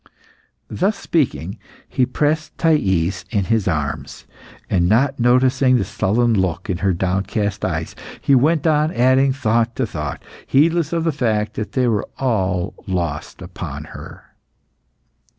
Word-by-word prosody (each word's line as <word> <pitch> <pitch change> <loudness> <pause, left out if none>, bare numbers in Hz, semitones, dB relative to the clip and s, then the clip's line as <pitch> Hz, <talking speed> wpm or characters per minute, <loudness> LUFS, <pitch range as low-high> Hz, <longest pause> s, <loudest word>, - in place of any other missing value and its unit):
'" - - -38 0.2
Thus 200 +4 0
speaking, 120 - -1 0.3
he 125 - +1
pressed 150 +4 -1
Thais 95 - +1
in 100 -4 0
his 110 0 +1
arms, 75 -5 -3 0.4
and 90 -2 +1
not 130 +5 +2
noticing 125 +1 +4
the 120 - 0
sullen 115 +5 +1
look 95 -3 -1
in 90 - -3
her 95 +1 +2
downcast 95 +3 -1
eyes, - - -2 0.2
he 140 - +2
went 150 +4 +3
on 155 0 +3
adding 130 +2 +3
thought 120 -3 0
to 130 - 0
thought, 75 -8 -5 0.2
heedless 160 +2 +2
of 165 -1 0
the 165 - +1
fact 110 -6 -1
that 110 - -5
they 130 -2 +2
were 110 -3 0
all 95 -7 0
lost 85 -5 -3
upon - - -7
her. - - -10
120 Hz, 145 wpm, -20 LUFS, 95-140 Hz, 0.4 s, noticing